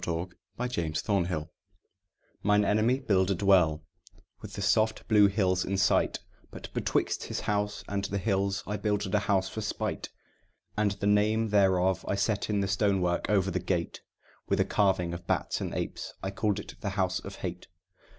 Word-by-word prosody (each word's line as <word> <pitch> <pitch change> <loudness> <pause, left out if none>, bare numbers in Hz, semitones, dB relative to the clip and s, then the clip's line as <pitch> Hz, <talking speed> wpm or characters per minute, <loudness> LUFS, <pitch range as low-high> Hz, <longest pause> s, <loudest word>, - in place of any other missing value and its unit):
THE - - -1 0.5
HOUSE 85 -11 -2
OF 100 -4 +2
HATE 80 -4 -3 0.9
Mine 105 0 +3
enemy 110 +6 +2
builded 95 -4 +1
well, 85 -6 +4 0.6
with - - -9
the - - -5
soft 110 0 +2
blue 105 -2 +6
hills 95 -2 +1
in 100 +1 -2
sight; 95 -1 +2 0.3
But - - -10
betwixt - - 0
his - - -4
house 105 0 -1
and 100 -1 -2
the 100 - -2
hills 100 -1 0
I 105 +1 -3
builded 105 -2 -1
a 105 - +4
house 100 -2 +1
for 110 - -5
spite: 105 - -3 0.7
And 105 -2 +1
the 100 0 -5
name 105 +2 +3
thereof 95 -2 +3
I - - 0
set 100 +2 0
in 105 -1 +1
the 100 - 0
stone 100 0 +2
work 90 -1 0
over 95 -2 +2
the 90 - -1
gate, 90 -1 -2 0.5
With - - +1
a - - +3
carving 95 -4 +1
of 85 0 -8
bats - - -1
and - - -3
apes; - - -4
and 95 - -2
I - - -19
called 105 -3 0
it - - -8
the 100 - -2
House 95 -1 +1
of 100 - -9
Hate. 90 -1 -6
100 Hz, 185 wpm, -29 LUFS, 95-105 Hz, 0.9 s, blue